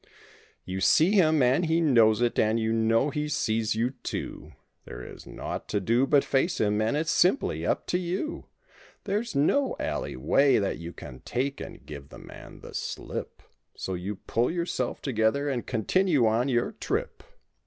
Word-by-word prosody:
i6 - - -29 0.6
You 95 +1 -4
see 160 - +5
him 160 -8 +4
and 130 +7 +3
he 165 +1 +2
knows 120 -8 +4
it 120 - +1
and 110 +1 +2
you 110 0 0
know 115 +5 +2
he 150 0 -2
sees 110 -5 0
you, 120 +3 0
too; - - -5 0.3
There 60 +1 -8
is - - -11
naught - - -6
to 105 - 0
do 120 +7 +2
but 145 -1 +4
face 140 +7 +1
him 105 0 +1
and 110 +6 +1
it's 160 +1 0
simply 185 +10 +2
up - - 0
to 180 - 0
you. 185 - -4 0.6
There's 210 +3 -2
no 265 - +2
alley - - -3
way 140 0 +3
that 100 -2 -1
you 85 0 -7
can 65 -6 -10
take 135 - -3
and - - -9
give 70 -2 -9
the - - -12
man - - -12
the - - -11
slip, - - -5 0.3
So 95 - -4
you 95 +3 -4
pull 115 +5 -1
yourself 170 -7 -2
together 130 +2 +1
and 130 -4 -2
continue 145 - +2
on 115 +4 +2
your 120 -2 +1
trip. - - -3
125 Hz, 180 wpm, -27 LUFS, 110-155 Hz, 0.6 s, see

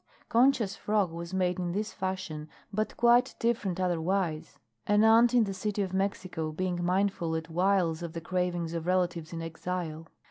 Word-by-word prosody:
Concha's 240 -4 +3
frock 205 -4 0
was 170 +1 -7
made 185 -1 0
in 175 -1 -2
this 210 +2 -2
fashion, 185 -5 -4 0.2
but 215 +1 -2
quite 240 +1 +4
different 210 -6 0
otherwise; 175 -2 -1 0.3
an 205 +1 +4
aunt 225 +2 +6
in 240 - +6
the 200 -2 -3
City 205 +1 -2
of 190 -1 -5
Mexico 185 -4 -2
being 175 +2 -2
mindful 180 -2 0
at 160 0 -4
whiles 175 -2 +2
of 170 -2 -5
the 165 - -5
cravings 175 -1 -1
of 165 0 -4
relatives 175 -3 0
in 165 -1 -5
exile. 165 -1 -4
185 Hz, 170 wpm, -29 LUFS, 170-200 Hz, 0.3 s, aunt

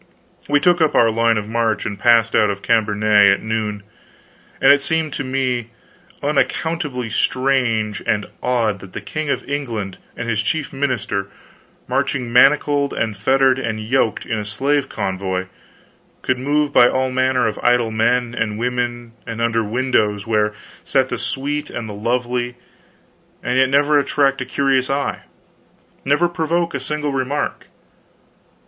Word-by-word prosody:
We 145 0 +4
took 175 +2 +3
up 155 - +2
our 115 -1 +5
line 115 0 +2
of 105 -1 -3
march 115 -1 0
and 100 -2 -4
passed 115 0 +4
out 105 -1 +4
of 100 -1 -4
Cambenet 105 -2 +4
at 100 - +1
noon; 110 -2 -3 0.8
and - - +6
it 145 - +1
seemed 160 0 -1
to 145 - -3
me 130 -3 -1 0.5
unaccountably 150 -2 -1
strange 120 -6 0
and 105 -1 +1 0.2
odd 115 -5 0
that 95 -1 -13
the - - -4
King 155 -1 -4
of - - -2
England 115 -9 -4 0.2
and 115 - -4
his 110 -2 0
chief 145 +6 -2
minister, 120 -8 -2 0.6
marching 125 -3 -1
manacled 140 +2 +4
and 110 -2 -2
fettered 130 +5 +2
and 110 -4 -3
yoked, 115 0 0
in 115 -2 -2
a - - -3
slave 135 +7 -1
convoy, 95 -2 -3 0.8
could 130 -1 0
move 145 +2 0
by 120 - +7
all 130 +1 0
manner 130 0 +1
of 105 - -2
idle 120 -2 +2
men 120 +2 +1
and 105 -2 -2
women, 120 0 -2 0.2
and 115 -1 -5
under 115 -1 +1
windows 105 -3 0
where 105 -1 +1 0.3
sat 135 -1 +1
the 120 - -3
sweet 145 +4 -3
and 115 -2 -5
the 105 - -7
lovely, 120 +3 -2 0.9
and 125 +1 +1
yet 130 -1 +4
never 145 +2 +4
attract 140 -1 +1
a - - -3
curious 135 -2 +1
eye, 140 0 -1 0.8
never 145 +5 +2
provoke 170 0 -1
a - - -2
single 150 +2 -3
remark. 135 +2 -2
125 Hz, 155 wpm, -19 LUFS, 110-140 Hz, 0.9 s, by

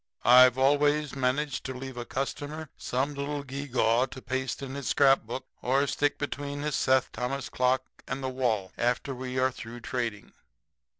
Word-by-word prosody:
I've 125 +1 +8
always 145 +2 +3
managed 135 +2 0
to 130 - -4
leave 130 0 -7
a 120 -1 -5
customer 145 +4 -4
some 135 +4 -1
little 140 +1 -3
gewgaw 130 -3 +1
to 130 - -9
paste 130 +1 -3
in 135 -1 -5
his 140 -2 -5
scrapbook 135 -3 +3 0.2
or 135 +3 +2
stick 145 +1 0
between 145 0 -4
his 150 -1 -1
Seth 130 -1 +2
Thomas 130 +2 -3
clock 130 +1 +2 0.2
and 135 0 -4
the - - -1
wall 115 -7 -1
after 125 +3 0
we 130 0 -5
are 130 0 +3
through 120 0 -9
trading. 115 -3 -4
130 Hz, 165 wpm, -28 LUFS, 125-140 Hz, 0.2 s, I've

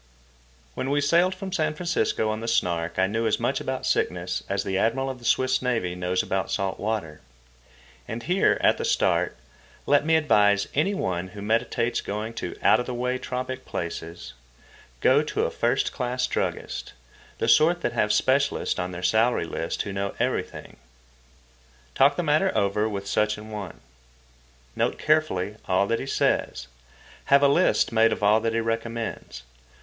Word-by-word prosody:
When 130 - -3
we 145 +1 +2
sailed 170 +6 +3
from 190 0 -7
San 155 -4 0
Francisco 170 -9 0
on 110 - -3
the 115 - -6
Snark 85 -7 0
I 95 - +4
knew 110 +4 -1
as 110 - +1
much - - -1
about - - -3
sickness 90 0 -1
as 100 0 -1
the 95 - -3
Admiral 135 +7 +1
of 130 - -10
the 120 - -13
Swiss 130 +2 +2
Navy 115 -8 -1
knows 90 0 -1
about 95 0 -2
salt 95 -2 -2
water. 100 -8 -3 0.9
And 115 +2 -5
here, 180 +6 +2
at - - +3
the - - -2
start, - - +1 0.5
let 145 0 +3
me 160 +1 +3
advise 105 -10 +3
any 180 +8 +1
one 90 - -2
who 100 +2 -10
meditates 115 +2 0
going 105 +3 -4
to - - -5
out 110 - +5
of 125 - -4
the 125 - -4
way 125 +1 -1
tropic 130 +1 -4
places. 85 -2 -6 0.7
Go - - +5
to - - -2
a - - -2
first - - 0
class 125 0 -1
druggist—the 60 - -5
sort 160 +9 +4
that - - -1
have 105 - +1
specialists 135 +2 +1
on 90 0 -3
their 90 +1 -7
salary 110 +2 +2
list 80 0 -3
who 100 - -6
know 100 0 -3
everything. - - -3 1.2
Talk 140 +1 +4
the 175 - -1
matter 155 +5 +2
over 105 +2 +1
with 100 -2 -5
such 105 +1 0
an 110 +1 -10
one. 100 -9 -7 0.9
Note - - 0
carefully 130 -11 0
all 95 +1 +2
that 115 +3 -1
he - - -5
says. 65 - 0 0.6
Have 140 +1 +5
a - - +7
list 155 +1 +3
made 115 0 +4
of - - -3
all 105 +2 +5
that 115 0 -1
he 115 - +1
recommends. 115 - -4
115 Hz, 175 wpm, -25 LUFS, 100-135 Hz, 1.2 s, a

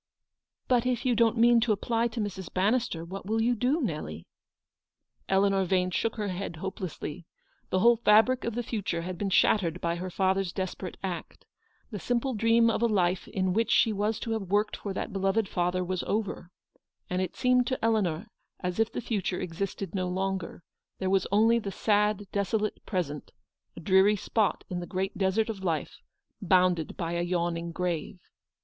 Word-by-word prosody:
"But 245 -2 +3
if 250 -1 -1
you 250 - +3
don't 230 0 +3
mean 235 +1 +6
to 230 -1 +2
apply 230 +3 +1
to 235 0 -6
Mrs. 190 -4 -4
Ban 195 +4 +2
nister, 230 -10 -2
what 195 +3 -7
will 220 +1 +1
you 235 +2 +3
do, 250 +7 +1
Nelly? 150 - -4 0.5
" - - -47
Eleanor 195 0 +3
Yane 185 0 +1
shook 225 - 0
her 210 -3 -2
head 185 -1 -4
hopelessly. 175 -2 -6 0.4
The 185 - +1
whole 235 +2 +6
fabric 225 +3 +4
of 230 -1 -3
the 240 - -1
future 200 -7 -3
had 185 +1 -4
been 200 - -1
shattered 180 -2 +3
by 170 0 -1
her 185 +2 -4
father's 190 0 +1
desperate 185 -1 -5
act. 180 -3 -5 0.5
The 205 - -4
simple 245 +5 -1
dream 230 +1 +4
of 230 - +1
a 235 - +4
life 185 -4 +1
in 185 -1 -1
which 225 +3 +1
she 225 - +4
was 210 +2 -1
to 230 - -3
have 215 -5 -3
worked 210 +2 +1
for 200 - -5
that 195 - -4
beloved 195 +2 +1
father 180 +1 0
was 185 0 -2
over, 205 -4 -2 0.6
and 180 0 -1
it 185 - -3
seemed 250 -1 +3
to 260 - 0
Eleanor 200 -5 +1 0.3
as 180 +2 -3
if 225 0 +2
the - - -4
future 200 -5 -2
existed 185 +1 -4
no 185 -2 -1
longer: 190 -1 -3 0.3
there 190 0 -1
was 195 -1 +2
only 225 +3 +4
the 200 -3 -5
sad, 210 0 +1
desolate 210 +1 -1
present, 160 -7 -3 0.2
— - - -54
a - - -8
dreary 190 +4 +4
spot 210 +1 0
in 180 - -3
the 175 - -6
great 190 +1 -2
desert 195 +3 +1
of 205 -4 -5
life, 165 -4 -2 0.4
bounded 180 -3 +2
by 170 -2 -2
a 170 - 0
yawning 170 -1 -1
grave. 175 -1 -3
195 Hz, 190 wpm, -28 LUFS, 180-225 Hz, 0.6 s, mean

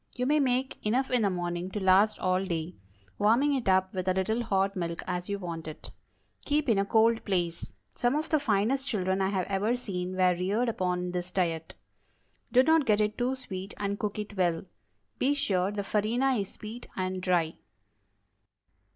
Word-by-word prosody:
You 250 - -1
may 300 +3 +3
make 260 -1 0
enough 255 +6 +1
in 250 -2 +3
the 205 - +3
morning 175 0 -3
to 210 - -4
last 195 +3 +4
all 185 0 +1
day; 170 -2 -3 0.4
warming 240 +8 +4
it 255 -7 0
up 190 0 +3
with 185 -1 -3
a 185 - +2
little 220 +5 0
hot 195 -3 0
milk 170 -2 -3
as 180 0 -3
you 200 - -1
want 170 -4 -6
it. 155 - -8 0.5
Keep 295 -2 0
in 215 -4 +4
a 200 - +2
cold 225 +2 +3
place. 175 -4 -2 0.2
Some 245 +3 +1
of 310 +1 -1
the 310 - +3
finest 255 +3 +1
children 190 -5 0
I 190 - +2
have 190 -2 -1
ever 205 +4 0
seen 185 -5 -4
were 185 -1 +4
reared 200 +7 0
upon 180 -4 -1
this 180 0 -3
diet. 165 -3 -2 0.8
Do 255 +1 +6
not 320 -1 +3
get 210 -1 +4
it 210 0 +1
too 255 +2 0
sweet, 195 -6 -7
and 200 0 -2
cook 210 -1 -3
it 210 0 -5
well. 175 -2 0 0.5
Be 280 +3 +2
sure 190 -9 +1
the 205 -1 -3
farina 230 +7 +1
is 200 -5 -1
sweet 225 +3 -9
and 185 0 -2
dry. 175 -3 +1
200 Hz, 190 wpm, -29 LUFS, 185-235 Hz, 0.8 s, Do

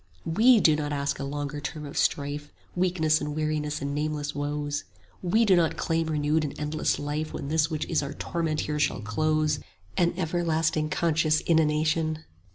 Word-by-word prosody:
35 160 - -3
WE 240 +1 +7
do 155 -6 +5
not 150 -1 -2
ask 140 -1 -1
a - - -3
longer 145 +1 -4
term 150 0 -5
of 140 - -8
strife, 145 +1 -1 0.2
Weakness 175 -4 +2
and 150 0 -3
weariness 155 -1 -1
and 140 0 -2
nameless 150 0 -2
woes; 145 0 -2 0.4
We 220 +6 +3
do 195 -3 +5
not 170 -2 +2
claim 165 -1 0
renewed 155 0 +1
and 145 -2 -5
endless 150 +1 0
life 150 +2 -3
When 140 - -5
this 155 0 +2
which 155 -2 -2
is - - +1
our 140 0 -4
torment 160 0 -2
here 150 0 -2
shall 135 - +1
close, 155 +7 +1 0.4
An 170 -1 +2
everlasting 160 -3 0
conscious 155 -1 +2
inanition! 155 0 +1
155 Hz, 175 wpm, -27 LUFS, 145-160 Hz, 0.4 s, WE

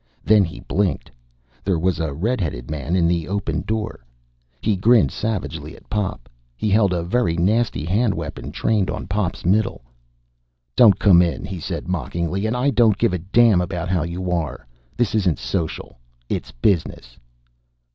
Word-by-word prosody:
Then 105 -1 +5
he 85 - -6
blinked. 100 0 -1 0.5
There 95 -3 +1
was 90 +2 0
a 80 -3 -1
red 105 - -1
headed 65 -6 -4
man 75 +3 -2
in 85 -2 +3
the 85 -1 0
opened 85 -6 -2
door. 110 - -3 0.6
He 105 +6 +1
grinned 110 +5 +4
savagely 85 -7 -4
at - - -18
Pop. 105 -9 -2 0.3
He 105 -1 -1
held 100 -2 +4
a 85 -2 -1
very 90 -2 0
nasty 105 -1 +1
hand 105 +4 +1
weapon - - -6
trained 105 -4 0
on - - -4
Pop's 95 -2 -2
middle. 95 - +1 0.9
"Don't 105 -6 +7
come 95 -5 +6
in!" 85 +1 -1
he 95 -2 -6
said - - -5
mockingly. 90 +2 -2
"And 120 +3 -1
I 135 +3 +2
don't 110 -4 +4
give 95 - +1
a 90 - -1
damn 100 +2 +4
about 90 -1 -3
how 90 -2 +1
you 90 +3 -3
are. 85 -7 -2 0.3
This 120 -3 +1
isn't 95 -7 +2
social. 85 -8 -4 0.3
It's - - -3
business!" 60 - -1
95 Hz, 165 wpm, -21 LUFS, 85-105 Hz, 0.9 s, Don't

